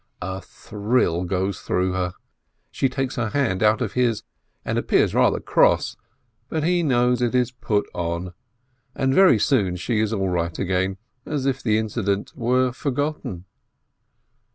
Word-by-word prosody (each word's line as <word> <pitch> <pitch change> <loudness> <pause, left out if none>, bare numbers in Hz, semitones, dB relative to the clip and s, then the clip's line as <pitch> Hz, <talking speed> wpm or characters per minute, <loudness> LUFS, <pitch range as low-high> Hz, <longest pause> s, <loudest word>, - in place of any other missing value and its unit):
A 95 +1 -4
thrill 100 -4 -1
goes 95 +2 -1
through 90 +1 0
her, 90 -1 -2 0.6
she 135 - 0
takes 135 0 -3
her 115 -3 0
hand 105 -8 0
out 110 +1 +3
of 110 -5 -2
his 120 -4 +1 0.4
and - - 0
appears - - +2
rather - - +3
cross, - - +2 0.5
but 160 -2 -1
he 175 +2 +2
knows 125 -4 +2
it 120 0 +1
is 125 -1 +2
put 105 -4 -1
on, 85 +1 -3 0.6
and 135 0 +1
very 185 - +6
soon 100 -6 +2
she 110 +5 -1
is 110 -1 +1
all 95 -4 0
right 85 -2 -1
again, 95 0 0 0.3
as 145 -3 -2
if 135 -1 0
the 110 -2 +2
incident 105 -2 -2
were 125 +1 +1
forgotten. 140 - -3
110 Hz, 155 wpm, -23 LUFS, 95-130 Hz, 0.6 s, very